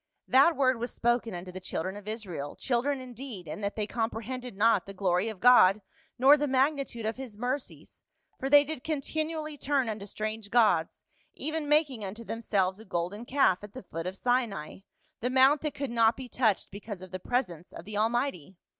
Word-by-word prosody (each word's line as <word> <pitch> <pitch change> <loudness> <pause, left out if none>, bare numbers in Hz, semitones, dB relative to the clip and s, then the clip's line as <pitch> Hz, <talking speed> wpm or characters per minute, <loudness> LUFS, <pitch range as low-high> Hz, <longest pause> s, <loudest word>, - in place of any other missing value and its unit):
" - - -54
That 275 +6 +5
word 260 -3 +2
was 240 +1 -3
spoken 240 -3 0
unto 180 +1 -7
the 185 - -7
Children 185 +1 -4
of 205 0 -10
Israel, 190 -10 -5
children 265 +2 0
indeed, 250 -7 -8
in 155 +6 -6
that 200 0 -2
they 215 - -1
comprehended 230 +1 -4
not 210 -3 +3
the 195 - -8
glory 185 +2 +1
of 215 -4 -8
God 215 -4 +7 0.4
nor 270 +4 +7
the 295 0 0
magnitude 270 -3 0
of 220 +1 -2
his 250 -6 -8
mercies, 245 - -5 0.4
for 270 - -2
they 290 0 +8
did 295 -3 -5
continually 310 0 -3
turn 275 -3 +1
unto 210 -2 -5
strange 215 +1 -4
gods, 205 -9 +2 0.3
even 310 -1 -3
making 295 -7 +2
unto 205 +4 -6
themselves 200 -4 -1
a - - -11
golden 190 +4 -3
calf 245 -9 +2
at 205 - -10
the 260 - -8
foot 165 -1 -5
of 190 +1 -5
Sinai, 235 -12 -1 0.4
the 245 - -1
mount 265 +3 +5
that 300 -2 -3
could 275 -3 -3
not 230 -1 +3
be 260 -1 -7
touched 225 -5 +1
because 200 -1 -8
of 185 - -11
the 185 - -5
presence 180 -7 -2
of 165 - -10
the 210 +1 -7
Almighty. 215 - -1
230 Hz, 195 wpm, -29 LUFS, 195-265 Hz, 0.4 s, they